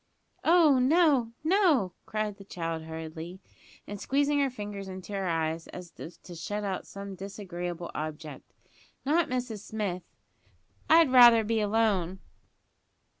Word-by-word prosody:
"Oh, 320 -6 +5
no, 275 -4 +3
no!" 315 - +3
cried 215 -2 -3
the 200 - -12
child 165 -4 -4
hurriedly, 160 +2 -7 0.5
and 205 -1 -7
squeezing 285 +1 +1
her 275 -1 +2
fingers 205 -5 -7
into 190 +1 -8
her 195 -1 -2
eyes, 165 -1 -1
as 180 -2 -10
if 165 - -9
to 180 - -10
shut 205 +5 -4
out 195 -2 -3
some 200 0 -8
disagreeable 180 -3 -6
object. 155 -2 -7 0.5
"Not 320 +4 +2
Mrs 250 -4 -3
Smith. 200 -3 -4 0.9
I'd 325 -4 +6
rather 240 -3 +8
be 225 +1 0
alone." 205 -4 +1
205 Hz, 130 wpm, -28 LUFS, 175-250 Hz, 0.9 s, rather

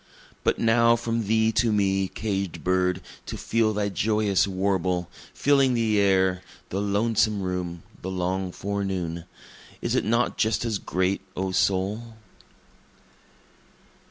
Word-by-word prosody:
But - - +2
now 115 +1 +4
from 115 -2 -2
thee 110 +1 +3
to 115 0 +2
me, 95 -2 +2
caged 95 -6 -3
bird, 90 0 +1 0.3
to - - -5
feel 115 -1 +1
thy 105 -1 -1
joyous 105 -1 +1
warble, 95 -2 -1 0.2
Filling 135 -3 +3
the 110 -3 +2
air, 95 -2 +3 0.3
the 95 - -2
lonesome 105 0 +1
room, 90 -2 -3 0.2
the 95 - -4
long 95 0 -2
forenoon, 95 -4 -3 0.5
Is - - -2
it - - +2
not 115 +2 0
just 110 +1 +1
as 110 -4 -1
great, 95 +2 -1 0.2
O 95 0 -1
soul? 100 +5 0
100 Hz, 130 wpm, -25 LUFS, 95-110 Hz, 0.5 s, now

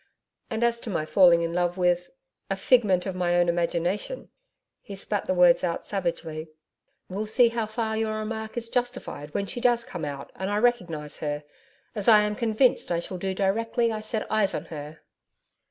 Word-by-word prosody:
And 225 -1 -2
as 235 0 +2
to 230 - -7
my 165 -6 -1
falling 170 0 +5
in 165 0 -2
love 175 +1 0
with 180 -1 +1 0.4
a - - 0
figment 205 -8 +3
of 190 - -3
my 175 -1 0
own 175 0 +3
imagination' 175 - -1 0.5
he 200 - -9
spat 200 +1 -2
the 185 - +1
words 180 -1 +5
out 170 -2 -2
savagely 165 -4 -3 0.6
'we'll 205 +3 -4
see 235 +2 +5
how 230 -2 -2
far 220 0 -2
your 220 0 -1
remark 220 +1 -5
is 230 -1 -3
justified 245 - -2
when 200 - 0
She 240 - -4
does 240 -1 +3
come 180 -9 -7
out 140 -2 -5
and 190 +1 -3
I 205 - 0
recognise 180 -11 0
her 145 -1 -3 0.5
as 205 -3 -3
I 215 -2 +8
am 210 0 -1
convinced 230 +3 +2
I 170 - +1
shall 180 +1 -6
do 190 +1 -2
directly 225 +4 +1
I 215 - -3
set 215 0 -3
eyes 215 -2 +2
on - - -4
Her.' 150 +1 -8
195 Hz, 190 wpm, -26 LUFS, 175-225 Hz, 0.6 s, I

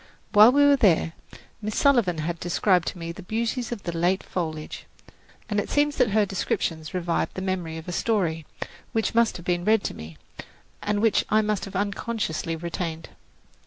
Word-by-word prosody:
While 215 +3 +8
we 285 +2 +5
were 285 -1 +6
there, 170 -7 +3 0.5
Miss 215 0 -3
Sullivan 235 - +3
had 165 +2 -3
described 175 +2 +2
to - - -3
me 165 -1 -5
the 170 - -9
beauties 230 +5 -2
of 230 -5 -5
the 170 -1 -4
late 180 +3 +1
foliage, 155 -4 -5 0.6
and 205 -1 0
it - - -3
seems 290 0 +1
that 250 -3 +3
her 210 +1 +3
descriptions 165 -4 -2
revived 175 -2 -1
the 185 - -4
memory 180 -4 -3
of 160 - -9
a - - -3
story, 175 -6 0 0.5
which 225 -1 0
must 230 -1 +3
have 175 - -12
been 175 -2 0
read 215 +1 +3
to - - -3
me, 80 0 -10 0.6
and 205 +1 -1
which 225 - +3
I 215 +1 +3
must 210 -1 -1
have 195 -1 -10
unconsciously 200 -4 -2
retained. 165 -1 -5
190 Hz, 185 wpm, -25 LUFS, 170-220 Hz, 0.6 s, While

